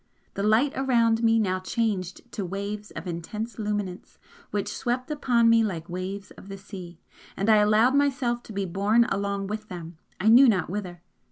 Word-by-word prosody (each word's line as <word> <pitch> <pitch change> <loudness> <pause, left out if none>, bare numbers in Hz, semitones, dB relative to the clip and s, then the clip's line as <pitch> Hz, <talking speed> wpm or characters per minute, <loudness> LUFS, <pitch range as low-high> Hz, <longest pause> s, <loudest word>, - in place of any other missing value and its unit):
The - - -4
light 220 +7 +3
around 235 -4 +2
me 225 -1 +4
now 185 -4 +1
changed 190 +1 -3
to 205 - -4
waves 200 +3 -5
of 160 - -8
intense 210 +7 -5
luminance 205 -3 -4 0.3
which 205 -1 -3
swept 250 +4 -2
upon 245 -6 +2
me 230 0 +5
like 170 -6 -3
waves 190 +3 -5
of - - -14
the 195 - -6
sea 185 -4 -10 0.4
and 195 - -1
I 215 - +7
allowed 215 +4 +4
myself 265 -4 +1
to - - -6
be 200 -1 -2
borne 200 +6 +2
along 200 0 -2
with 215 +2 -5
them, 170 -3 -9 0.2
I 210 - 0
knew 250 +3 +8
not 185 -5 0
whither. 180 -4 -5
210 Hz, 180 wpm, -26 LUFS, 190-230 Hz, 0.4 s, knew